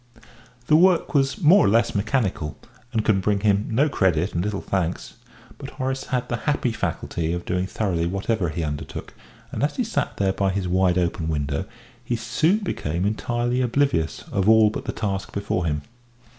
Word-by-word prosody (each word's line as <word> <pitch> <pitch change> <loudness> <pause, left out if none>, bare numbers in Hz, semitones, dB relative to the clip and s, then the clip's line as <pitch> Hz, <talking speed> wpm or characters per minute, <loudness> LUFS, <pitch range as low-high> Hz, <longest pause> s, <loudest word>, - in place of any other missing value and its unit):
The 155 - +4
work 175 +1 +4
was 140 +7 +1
more 180 +7 +7
or - - +4
less 115 +2 +3
mechanical, 100 - -1 0.3
and 110 -2 -1
could 100 -3 +3
bring 100 +1 +1
him 105 0 +2
no 130 +7 +3
credit 95 - +1
and 85 - 0
little 105 -1 -2
thanks, 90 -3 -2 0.5
but 140 - -7
Horace 135 0 -3
had 125 -1 -2
the 120 - -2
happy 135 -4 +1
faculty 85 -6 -2
of 85 0 -4
doing 90 0 -1
thoroughly 90 -6 -1
whatever 100 0 -1
he 85 +2 -3
undertook, 75 -2 -5 0.4
and - - -4
as 145 - 0
he 250 - 0
sat 225 - -2
there 95 -1 +1
by 95 0 0
his 95 -1 -1
wide 90 0 +2
open 85 -2 -1
window 75 +2 -1 0.4
he 120 0 -1
soon 155 - +1
became 85 - -2
entirely 120 +4 0
oblivious 120 - 0
of 100 +1 +2
all 110 -1 +6
but - - -6
the - - -2
task 100 -3 -3
before 100 -4 -1
him. 75 -1 -1
100 Hz, 185 wpm, -23 LUFS, 90-125 Hz, 0.5 s, more